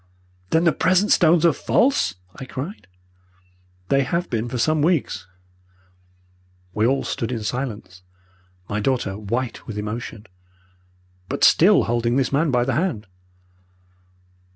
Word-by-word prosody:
"'Then 160 - +2
the 170 - +4
present 185 +5 +2
stones 170 -1 +4
are 165 - +5
false?' 235 - +1 0.2
I 130 - -8
cried. 140 - -7 1.0
"'They 140 0 +3
have 170 +6 -2
been 115 0 -2
for 125 - -4
some 155 +5 +1
weeks.' 145 - 0 1.5
"We 110 +2 +2
all 135 +2 +1
stood 120 -4 -3
in 115 -3 -3
silence, 105 -5 -5 0.7
my 105 - -2
daughter 110 -4 -1
white 115 +4 -4
with 110 - -6
emotion, 105 +1 -6 1.0
but - - -3
still - - +6
holding 120 +1 0
this 135 0 0
man 150 +3 +2
by 125 -2 +2
the 130 +1 -1
hand. 145 - -1
125 Hz, 130 wpm, -22 LUFS, 110-155 Hz, 1.5 s, still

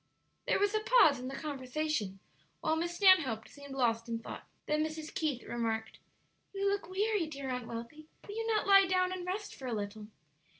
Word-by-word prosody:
There - - +3
was 405 +1 +2
a 435 - +2
pause 430 - +5
in 250 - -5
the 270 - -5
conversation, 275 -7 -2 0.4
while 315 0 +1
Miss 345 +2 -2
Stanhope 315 - +5
seemed 280 -1 -10
lost 230 -2 +1
in 230 - -1
thought. 225 - -9 0.2
Then 305 +1 +1
Mrs. 315 0 -5
Keith 290 -6 -1
remarked: 225 -2 -3 0.6
"You 395 0 0
look 400 -2 -1
weary, 400 -2 +1
dear 280 -3 -6
Aunt 250 -2 -3
Wealthy; 235 +7 -7 0.2
will 410 - -6
you 455 0 -2
not 435 -2 +1
lie 390 -1 +7
down 365 0 +2
and 365 -1 -5
rest 410 +3 -3
for 265 - -8
a 240 - -2
little?" 210 +1 -5
305 Hz, 195 wpm, -32 LUFS, 240-375 Hz, 0.6 s, lie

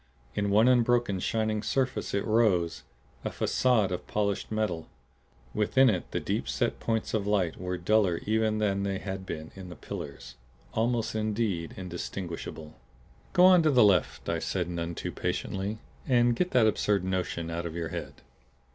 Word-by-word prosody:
In 100 +3 0
one 105 +4 +5
unbroken, 120 -5 +3
shining 110 +1 0
surface 130 +2 -1
it 100 - 0
rose, 100 -7 +2 0.4
a - - -1
facade 120 -7 +2
of 90 - -4
polished 100 -1 -1
metal. 105 -7 -1 0.7
Within 125 +4 +4
it 90 -4 -3
the - - -2
deep - - -2
set - - -1
points 110 -1 -1
of 105 -2 0
light 95 -5 +1
were 90 0 -2
duller 95 -1 +2
even 110 0 +1
than 100 -2 +1
they 100 -1 -1
had 95 +1 -6
been 80 0 -6
in 95 -2 -9
the 90 - -8
pillars; 60 -6 -8 0.4
almost 115 0 0
indeed 105 -6 -1
indistinguishable. 85 -3 -6 0.6
"Go 180 - +6
on 185 -2 +8
to 155 - +3
the 125 -5 +6
left," 95 -5 +2
I - - 0
said 90 -3 -2
none 85 -1 -3
too - - -4
patiently. 100 +3 -3 0.3
"And 120 -2 +4
get 180 +8 0
that 125 -8 +4
absurd 105 -2 +2
notion 90 -3 -2
out 85 +1 -3
of 80 - -7
your 85 -2 -3
head." - - -5
100 Hz, 165 wpm, -28 LUFS, 90-110 Hz, 0.7 s, on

